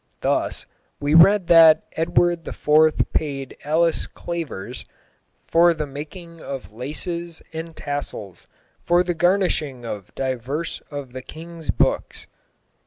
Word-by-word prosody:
Thus, - - 0 0.3
we 145 +1 0
read 185 +4 +7
that 165 -2 +7
Edward 170 +1 +1
IV. 155 +1 +3
paid 135 -3 -2
Alice 160 +3 +2
Clavers, 165 - -6 0.6
"for 170 0 +4
the 155 -1 -3
makyng 160 +4 -9
of 135 -5 -7
xvj. - - -21
laces 170 +6 -4
and 160 +1 -5
xvj. - - -12
tassels 145 - -5 0.4
for 175 +1 +3
the 175 0 -1
garnysshing 170 -8 +1
of 105 -4 -7
divers 135 +4 -3
of 140 -4 -7
the 130 - -6
kinge's 165 +3 -11
bookes - - 0
ijs. - - -35
155 Hz, 130 wpm, -22 LUFS, 140-170 Hz, 0.6 s, read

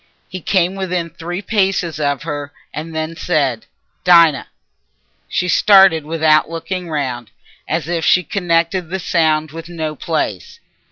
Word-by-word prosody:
He 185 0 -7
came 185 +1 +1
within 180 -3 -3
three 175 +4 -6
paces 190 -7 0
of 145 -2 -1
her 145 -2 -5 0.2
and 160 +1 -6
then 160 +1 -3
said, 140 -9 -1 0.4
"Dinah!" 170 -5 +5 0.8
She 180 - -1
started 190 -5 +5
without 155 -1 +2
looking 175 +2 -5
round, 130 -7 -3 0.4
as - - -2
if 170 -1 -2
she 180 - +4
connected 170 -1 0
the 190 - -2
sound 155 -4 +1
with 165 +1 -9
no 160 -3 -4
place. 145 - -3
165 Hz, 135 wpm, -17 LUFS, 155-180 Hz, 0.8 s, Dinah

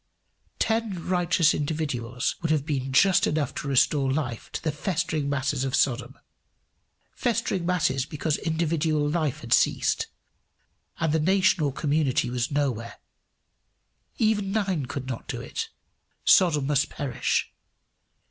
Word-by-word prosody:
Ten 220 -6 -1
righteous 175 -3 +3
individuals 140 -6 -2
would 165 - -1
have 155 -3 +1
been 135 -4 -2
just 185 +7 +4
enough 150 -3 -1
to - - -5
restore 135 0 +3
life 130 -5 -3
to - - -4
the 160 - 0
festering 155 -2 -2
masses 140 -1 -1
of 135 +1 -1
Sodom 130 -2 0 1.0
festering 230 -7 -1
masses 140 -7 +1
because 150 0 -1
individual 160 -2 0
life 155 -3 -1
had - - 0
ceased, - - +2 0.9
and 160 -2 +1
the 160 - +3
nation 190 +2 +3
or 145 -2 +1
community 140 -4 0
was 120 0 -1
nowhere. 130 -6 -2 1.2
Even 210 -3 +1
nine 190 -10 -1
could 140 0 -5
not 130 -3 -5
do - - -4
it: - - -5 0.6
Sodom 150 -7 +5
must 140 -1 +1
perish. 135 -4 -1
150 Hz, 130 wpm, -26 LUFS, 135-170 Hz, 1.2 s, Sodom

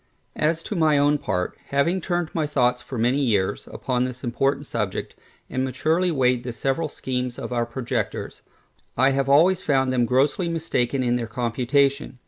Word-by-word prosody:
As 160 +2 0
to 210 - -4
my 155 -4 +3
own 145 +1 +3
part, 90 -9 -2
having 170 +7 +1
turned 175 -1 -2
my 155 -2 0
thoughts 125 -4 +1
for 125 +1 -7
many 120 +5 +2
years 105 -9 0
upon 125 -1 -1
this 125 0 -5
important 135 +4 0
subject, 105 -8 -3 0.3
and 130 - -2
maturely 160 +8 +1
weighed 125 -5 +2
the 125 -1 -5
several 135 +6 -1
schemes 125 -3 -3
of - - -5
our 120 -1 0
projectors, 120 0 -3 0.6
I 130 +1 +4
have 135 0 0
always 170 +6 +5
found 135 -4 +1
them 120 -2 +2
grossly 140 +8 +2
mistaken 140 -6 -1
in 120 0 +1
their 115 -2 -3
computation. 125 +4 0
130 Hz, 170 wpm, -24 LUFS, 125-150 Hz, 0.6 s, always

